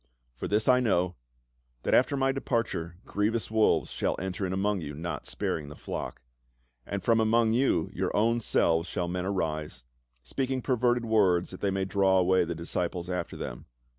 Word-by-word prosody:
For -, -, -4 dB
this 105 Hz, +1 st, +1 dB
I 125 Hz, -1 st, +6 dB
know, 90 Hz, -7 st, +1 dB, 0.7 s
that -, -, 0 dB
after 140 Hz, -, +4 dB
my 135 Hz, 0 st, +2 dB
departure 115 Hz, -10 st, -2 dB
grievous 105 Hz, +1 st, -1 dB
wolves 110 Hz, -1 st, +3 dB
shall -, -, -1 dB
enter 95 Hz, +1 st, -3 dB
in -, -, -4 dB
among 100 Hz, 0 st, 0 dB
you, 75 Hz, -2 st, -6 dB
not 85 Hz, +3 st, -5 dB
sparing 75 Hz, -3 st, -3 dB
the 75 Hz, -, -9 dB
flock. -, -, -6 dB, 0.6 s
And 100 Hz, -1 st, -3 dB
from 115 Hz, -1 st, +3 dB
among 110 Hz, 0 st, +3 dB
your 120 Hz, -9 st, +1 dB
own 115 Hz, +3 st, +3 dB
selves 85 Hz, -6 st, +2 dB
shall 90 Hz, -, -2 dB
men 90 Hz, +1 st, -2 dB
arise, 80 Hz, -9 st, -3 dB, 0.4 s
speak 130 Hz, -, -2 dB
ing 130 Hz, -2 st, -1 dB
perverted 125 Hz, -2 st, +1 dB
words 95 Hz, -6 st, +3 dB
that 95 Hz, -, -9 dB
they 100 Hz, -, 0 dB
may 95 Hz, 0 st, -1 dB
draw 95 Hz, -1 st, +3 dB
away 95 Hz, 0 st, +3 dB
the 85 Hz, 0 st, -4 dB
dis 85 Hz, +1 st, -6 dB
ciples 90 Hz, 0 st, -2 dB
after 90 Hz, 0 st, -3 dB
them. -, -, -7 dB
95 Hz, 180 wpm, -28 LUFS, 85-115 Hz, 0.7 s, I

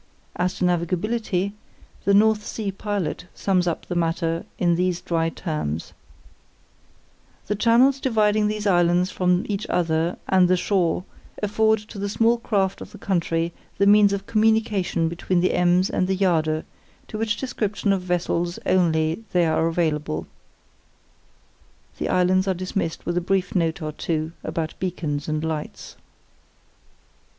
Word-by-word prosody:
As 180 Hz, +1 st, -1 dB
to 180 Hz, -, 0 dB
navigability, 180 Hz, +3 st, 0 dB, 0.5 s
the 200 Hz, -, +4 dB
North 215 Hz, 0 st, +4 dB
Sea 210 Hz, -2 st, -4 dB
Pilot 195 Hz, -4 st, -3 dB
sums 185 Hz, -2 st, +1 dB
up 170 Hz, -, -2 dB
the -, -, -4 dB
matter 165 Hz, -1 st, -1 dB
in 175 Hz, -1 st, +2 dB
these 180 Hz, 0 st, 0 dB
dry 165 Hz, -1 st, 0 dB
terms: 150 Hz, -, -4 dB, 1.5 s
"The 210 Hz, -, -1 dB
channels 240 Hz, +6 st, +4 dB
dividing 215 Hz, -4 st, +2 dB
these 210 Hz, 0 st, -3 dB
islands 175 Hz, -1 st, +3 dB
from 180 Hz, 0 st, +1 dB
each 205 Hz, +1 st, -3 dB
other 170 Hz, -1 st, 0 dB
and 185 Hz, -1 st, +4 dB
the 185 Hz, +1 st, +3 dB
shore 180 Hz, -2 st, +1 dB, 0.4 s
afford 220 Hz, +1 st, +3 dB
to 210 Hz, -1 st, -10 dB
the 200 Hz, 0 st, -2 dB
small 230 Hz, +3 st, +2 dB
craft 195 Hz, -4 st, 0 dB
of -, -, -10 dB
the -, -, -9 dB
country 170 Hz, -2 st, -1 dB, 0.2 s
the 200 Hz, -, +3 dB
means 205 Hz, 0 st, +6 dB
of 200 Hz, 0 st, -3 dB
communication 215 Hz, -6 st, +1 dB
between 175 Hz, +2 st, -1 dB
the 180 Hz, -, +2 dB
Ems 180 Hz, +1 st, +3 dB
and 185 Hz, -, 0 dB
the 190 Hz, -, +1 dB
Jade, 160 Hz, -5 st, +1 dB, 0.4 s
to 215 Hz, -, -6 dB
which 220 Hz, -2 st, 0 dB
description 210 Hz, -5 st, -1 dB
of 190 Hz, -, -1 dB
vessels 175 Hz, -1 st, -1 dB
only 165 Hz, +1 st, +2 dB
they 175 Hz, -1 st, +4 dB
are 160 Hz, 0 st, +2 dB
available." 155 Hz, -, -1 dB, 1.7 s
The -, -, -2 dB
islands 185 Hz, +1 st, +2 dB
are 190 Hz, -, +1 dB
dismissed 185 Hz, -2 st, -3 dB
with 175 Hz, 0 st, -1 dB
a -, -, +2 dB
brief 190 Hz, +1 st, 0 dB
note 165 Hz, -2 st, 0 dB
or 155 Hz, -, -3 dB
two 155 Hz, +1 st, -2 dB
about 160 Hz, -2 st, -3 dB
beacons 155 Hz, -6 st, -3 dB
and 155 Hz, 0 st, -1 dB
lights. 160 Hz, -2 st, -5 dB
180 Hz, 145 wpm, -23 LUFS, 165-205 Hz, 1.7 s, means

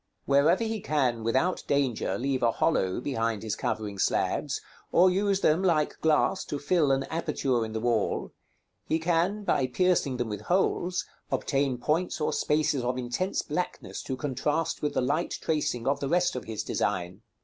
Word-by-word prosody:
Wherever 150 Hz, +9 st, +4 dB
he 225 Hz, -1 st, -2 dB
can, 130 Hz, -9 st, 0 dB
without 130 Hz, +11 st, +1 dB
danger, 130 Hz, -8 st, 0 dB
leave 130 Hz, +1 st, -1 dB
a 115 Hz, -1 st, +3 dB
hollow 95 Hz, -, +1 dB
behind 115 Hz, -5 st, -2 dB
his 110 Hz, -2 st, -2 dB
covering 105 Hz, -3 st, -3 dB
slabs, -, -, 0 dB, 0.3 s
or 180 Hz, +2 st, +5 dB
use 195 Hz, +1 st, +1 dB
them, 155 Hz, +4 st, +3 dB
like 165 Hz, -5 st, +1 dB
glass, 155 Hz, -1 st, +2 dB
to 145 Hz, -, -3 dB
fill 150 Hz, -1 st, +2 dB
an 135 Hz, 0 st, +2 dB
aperture 140 Hz, -7 st, -1 dB
in 110 Hz, 0 st, -5 dB
the 110 Hz, -, -2 dB
wall, 115 Hz, -2 st, 0 dB, 0.6 s
he 160 Hz, -, +2 dB
can, 175 Hz, +5 st, 0 dB
by 135 Hz, -9 st, +1 dB
piercing 150 Hz, -2 st, +1 dB
them 120 Hz, -1 st, -1 dB
with 105 Hz, -2 st, -5 dB
holes, 180 Hz, -, 0 dB, 0.3 s
obtain 135 Hz, -2 st, 0 dB
points 160 Hz, +9 st, 0 dB
or 150 Hz, -, 0 dB
spaces 150 Hz, -2 st, +1 dB
of 125 Hz, +1 st, -1 dB
intense 130 Hz, +10 st, -1 dB
blackness 180 Hz, +4 st, -4 dB
to 130 Hz, -, -4 dB
contrast 145 Hz, +4 st, -1 dB
with 150 Hz, -, -1 dB
the -, -, +2 dB
light 145 Hz, +7 st, 0 dB
tracing 150 Hz, -6 st, -1 dB
of 140 Hz, +1 st, +2 dB
the 140 Hz, -, -2 dB
rest 175 Hz, -1 st, +2 dB
of 125 Hz, -, -5 dB
his 110 Hz, -1 st, -4 dB
design. 95 Hz, 0 st, -2 dB
140 Hz, 170 wpm, -28 LUFS, 120-165 Hz, 0.6 s, or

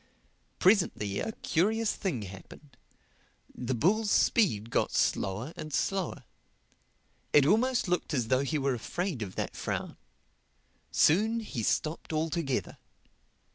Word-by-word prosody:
Presently 175 Hz, -, +2 dB
a -, -, -2 dB
curious 215 Hz, +4 st, 0 dB
thing 145 Hz, -, -3 dB
happened: 100 Hz, -, -12 dB, 0.8 s
the 125 Hz, +1 st, -3 dB
bull's 205 Hz, -, +2 dB
speed 115 Hz, -, +2 dB
got -, -, +1 dB
slower 105 Hz, -, 0 dB
and 155 Hz, -, -7 dB
slower. 190 Hz, +4 st, -1 dB, 1.1 s
It 145 Hz, -2 st, +6 dB
almost 235 Hz, -, +2 dB
looked 180 Hz, -3 st, -1 dB
as 125 Hz, -7 st, -1 dB
though 130 Hz, 0 st, +3 dB
he 150 Hz, +3 st, -1 dB
were 140 Hz, -1 st, +1 dB
afraid 160 Hz, -, -3 dB
of 95 Hz, -3 st, -5 dB
that -, -, -3 dB
frown. -, -, -4 dB, 0.9 s
Soon 220 Hz, +8 st, +3 dB
he 165 Hz, -, -5 dB
stopped 155 Hz, +10 st, -1 dB
altogether. 155 Hz, -3 st, -2 dB
155 Hz, 120 wpm, -29 LUFS, 125-200 Hz, 1.1 s, It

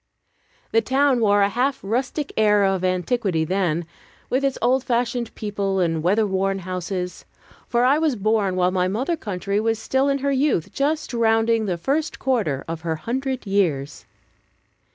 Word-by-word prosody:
The 225 Hz, -, +4 dB
town 270 Hz, 0 st, +2 dB
wore 205 Hz, -2 st, +4 dB
a 200 Hz, -, +3 dB
half 260 Hz, +5 st, 0 dB
rustic 260 Hz, +7 st, -2 dB
air 210 Hz, -2 st, +4 dB
of 195 Hz, -1 st, +1 dB
antiquity 185 Hz, -1 st, 0 dB
then, 175 Hz, -2 st, 0 dB, 0.5 s
with 260 Hz, +2 st, +1 dB
its 275 Hz, -1 st, 0 dB
old 250 Hz, +2 st, +2 dB
fashioned 240 Hz, -1 st, -1 dB
people 200 Hz, -2 st, -2 dB
and 165 Hz, -3 st, 0 dB
weather 200 Hz, +6 st, +2 dB
worn 195 Hz, 0 st, 0 dB
houses; 180 Hz, 0 st, -4 dB, 0.4 s
for 240 Hz, 0 st, +2 dB
I 280 Hz, +4 st, +4 dB
was 315 Hz, -5 st, +1 dB
born 205 Hz, -2 st, +1 dB
while 180 Hz, 0 st, +2 dB
my 185 Hz, -1 st, +1 dB
mother 255 Hz, -, -1 dB
century 200 Hz, 0 st, -2 dB
was 225 Hz, +1 st, 0 dB
still 265 Hz, +5 st, 0 dB
in 275 Hz, -, +2 dB
her 280 Hz, +1 st, -1 dB
youth, 270 Hz, -, 0 dB
just 295 Hz, 0 st, -1 dB
rounding 225 Hz, -1 st, +2 dB
the 180 Hz, -2 st, -1 dB
first 290 Hz, -, -1 dB
quarter 210 Hz, -, -1 dB
of 165 Hz, -1 st, -5 dB
her 165 Hz, -1 st, -2 dB
hundred 260 Hz, -, -3 dB
years. 160 Hz, -9 st, -1 dB
215 Hz, 165 wpm, -22 LUFS, 185-255 Hz, 0.5 s, The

